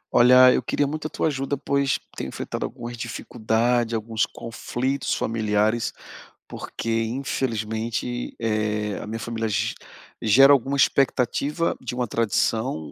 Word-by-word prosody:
Olha, 125 Hz, +1 st, +8 dB
eu -, -, +1 dB
queria 145 Hz, -, 0 dB
muito 155 Hz, +2 st, -3 dB
a -, -, -10 dB
tua -, -, -2 dB
ajuda, 140 Hz, -2 st, -1 dB
pois 140 Hz, -1 st, +1 dB, 0.2 s
tenho -, -, -4 dB
enfrentado -, -, -5 dB
algumas 120 Hz, -1 st, -8 dB
dificuldade, 120 Hz, 0 st, -1 dB
alguns 110 Hz, 0 st, -1 dB
conflitos 130 Hz, +3 st, -3 dB
familiares, 110 Hz, 0 st, 0 dB, 0.6 s
porque 115 Hz, 0 st, -3 dB
infelizmente, 115 Hz, -1 st, -3 dB
eh, 105 Hz, -2 st, -1 dB
a -, -, -7 dB
minha 110 Hz, +1 st, -4 dB
família 115 Hz, 0 st, -3 dB
ge 100 Hz, -, 0 dB, 0.5 s
gera 135 Hz, +6 st, +7 dB
alguma 140 Hz, +1 st, +1 dB
expectativa 140 Hz, +4 st, +1 dB
de 125 Hz, -1 st, -5 dB
uma 125 Hz, -1 st, -1 dB
tradição 110 Hz, -, 0 dB
120 Hz, 130 wpm, -24 LUFS, 110-135 Hz, 0.6 s, Olha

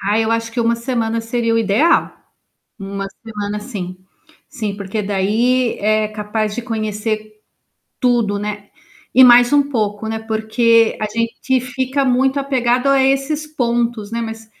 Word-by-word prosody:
Ah, 205 Hz, +2 st, +1 dB
eu 225 Hz, 0 st, +1 dB
acho 230 Hz, 0 st, -1 dB
que 235 Hz, -, -1 dB
1 230 Hz, 0 st, +2 dB
semana 230 Hz, -2 st, -2 dB
seria 230 Hz, 0 st, -1 dB
o 230 Hz, -, +3 dB
ideal. 225 Hz, +9 st, +2 dB, 0.7 s
1 195 Hz, 0 st, -5 dB, 0.2 s
semana, 210 Hz, -1 st, -4 dB
sim. 195 Hz, -5 st, -6 dB, 0.5 s
Sim, 215 Hz, -8 st, -4 dB
porque 200 Hz, +1 st, -3 dB
daí 225 Hz, +6 st, +1 dB
é 215 Hz, +1 st, +1 dB
capaz 210 Hz, 0 st, -3 dB
de 240 Hz, -, -3 dB
conhecer 215 Hz, -2 st, -3 dB, 0.6 s
tudo, 235 Hz, -5 st, +1 dB
né, 205 Hz, 0 st, -5 dB, 0.4 s
e 260 Hz, -, +8 dB
mais 245 Hz, +1 st, +7 dB
um 285 Hz, -1 st, +4 dB
pouco, 215 Hz, -4 st, -2 dB
né, 220 Hz, 0 st, -2 dB
porque 225 Hz, +1 st, +2 dB
a -, -, 0 dB
gente 230 Hz, +4 st, -1 dB
fica 260 Hz, +2 st, -2 dB
muito 265 Hz, +2 st, +2 dB
apegado 255 Hz, -1 st, 0 dB
a 275 Hz, -1 st, +4 dB
esses 275 Hz, +3 st, 0 dB
pontos, 235 Hz, -6 st, -1 dB
né, 230 Hz, -, -2 dB
mas 225 Hz, 0 st, -7 dB
230 Hz, 150 wpm, -18 LUFS, 210-250 Hz, 0.7 s, e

